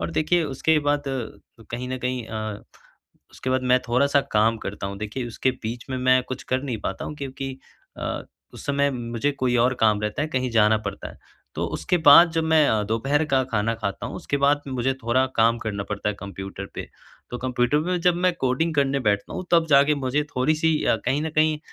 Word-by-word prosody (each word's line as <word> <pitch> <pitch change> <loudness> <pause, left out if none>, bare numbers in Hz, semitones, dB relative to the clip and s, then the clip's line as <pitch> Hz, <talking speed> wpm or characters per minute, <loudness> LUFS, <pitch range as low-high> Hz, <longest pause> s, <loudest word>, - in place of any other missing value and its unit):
और 80 0 -3
देखिए, 165 - +1
उसके 150 +2 +1
बाद 145 -1 0
अ, 120 -3 -7
कहीं 125 +2 -4
न 130 - -3
कहीं 125 -1 -3
अ, 110 -2 -5 0.7
उसके 130 - -5
बाद 130 0 +1
मैं 125 0 +4
थोड़ा-सा 140 +4 +3
काम 110 +2 +3
करता 100 -1 -5
हूँ। 100 - -6
देखिए, 110 +4 -4
उसके 120 +2 0
बीच 115 +2 -5
में 130 - -2
मैं 130 0 +4
कुछ 130 - -5
कर 130 +1 -1
नहीं 125 -6 -3
पाता 95 - -4
हूँ - - -6
क्योंकि 135 -1 -6 0.4
अ, - - -3 0.3
उस - - -10
समय 140 0 +2
मुझे 120 +1 -2
कोई 130 -3 0
और 125 +2 +3
काम 105 -2 +3
रहता 105 +7 -2
है, 155 - -2
कहीं 130 -3 -1
जाना 110 -1 +4
पड़ता 100 - -5
है। - - -16 0.4
तो - - -2
उसके 180 - 0
बाद 170 +4 +9
जब 165 0 0
मैं 160 -2 +4
अ, 110 -1 +2
दोपहर 135 +8 0
का 130 - +4
खाना 110 +1 +1
खाता 100 -3 -4
हूँ - - -6
उसके 140 - -2
बाद 145 +1 +3
मुझे 130 0 0
थोड़ा 125 +3 +2
काम 115 +1 +4
करना 105 -3 -4
पड़ता 105 0 -2
है 105 - -1
कंप्यूटर 95 0 -7
पे। - - -6 0.4
तो 125 - -4
कंप्यूटर 125 +2 +1
में 180 -1 0
जब 180 0 +4
मैं 180 - +4
कोडिंग 145 +6 0
करने 140 -1 +1
बैठता 105 -4 0
हूँ - - -4
तब 165 -1 +5
जाके 140 +1 +5
मुझे 145 +4 +1
थोड़ी-सी 155 +4 +2
अ, - - +3
कहीं 145 +3 +1
न 160 - -2
कहीं 155 0 +3
130 Hz, 215 wpm, -24 LUFS, 115-145 Hz, 0.7 s, बाद